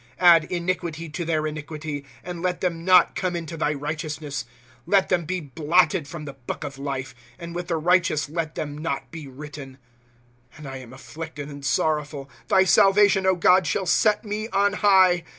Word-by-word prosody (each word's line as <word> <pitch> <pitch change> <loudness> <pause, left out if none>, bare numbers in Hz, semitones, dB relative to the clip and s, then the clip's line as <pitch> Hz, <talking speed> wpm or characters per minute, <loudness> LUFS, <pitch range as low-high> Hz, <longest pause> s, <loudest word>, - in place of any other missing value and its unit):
" - - -30
Add 170 -3 +7
iniquity 170 -2 -3
to 170 +4 -4
their 155 -2 0
iniquity. 150 -1 -5 0.2
And 175 -1 -6
let 180 0 -1
them 170 -3 -2
not 185 0 +5
come 180 -2 -2
into 165 -1 -5
thy 150 -2 0
righteousness. 150 -2 -4 0.4
5f! - - -11
Let 195 -1 +4
thera 170 -3 0
be 185 +2 -1
blotted 155 +3 +1
from 155 0 -8
the 140 - -7
book 130 +1 -7
of 140 -2 -7
life, 135 -2 -4 0.2
And 170 0 -8
with 175 0 -5
the 170 -2 0
righteous 170 -4 +2
let 160 0 -4
them 145 -1 -4
not 145 -3 -4
be 160 -3 -8
written. 140 0 -10 0.8
^® - - -15
And 150 -2 -9
I 135 0 -6
am 125 -2 -11
afflicted 145 +2 -8
and 140 -1 -10
sorrowful; 145 0 -1 0.2
Thy 190 - +5
salvation, 195 0 +4
God, 180 0 +4
shall 185 +7 -1
set 210 +5 +2
me 210 +1 -3
on 200 0 +2
high. 190 -4 +4
160 Hz, 185 wpm, -24 LUFS, 145-180 Hz, 0.8 s, Add